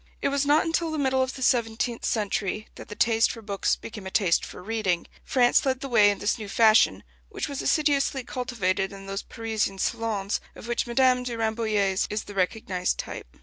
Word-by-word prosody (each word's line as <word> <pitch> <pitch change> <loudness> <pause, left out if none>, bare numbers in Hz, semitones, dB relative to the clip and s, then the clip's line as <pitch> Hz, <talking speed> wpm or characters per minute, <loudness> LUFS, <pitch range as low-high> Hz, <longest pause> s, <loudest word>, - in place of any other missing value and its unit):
It - - 0
was 280 0 0
not 295 +2 +4
until 330 0 0
the 315 - -3
middle 265 -2 +1
of 260 0 -1
the 260 - -5
seventeenth 235 -2 0
century 210 -1 -1
that - - -11
the 210 - -8
taste 225 0 +3
for 225 - -9
books 200 -2 0
became 210 -4 -9
a - - -4
taste 190 -4 +2
for - - -9
reading. 200 -5 -1 0.2
France 245 -2 +3
led 265 -1 0
the 275 - -4
way 215 -4 +6
in 205 - 0
this 205 +3 -1
new 210 -2 -6
fashion, 215 - +4 0.3
which - - -4
was 280 -2 -4
assiduously 280 -4 +1
cultivated 205 -7 -2
in 195 0 -10
those 195 +1 -4
Parisian 220 -3 -3
salons 215 -1 -1
of - - -10
which 240 +1 -1
Madame 250 +1 +3
de 245 -2 -4
Rambouillet's 215 -4 0
is 210 +1 -2
the 205 - -10
recognized 185 -1 -1
type. - - -7
225 Hz, 200 wpm, -26 LUFS, 200-250 Hz, 0.3 s, way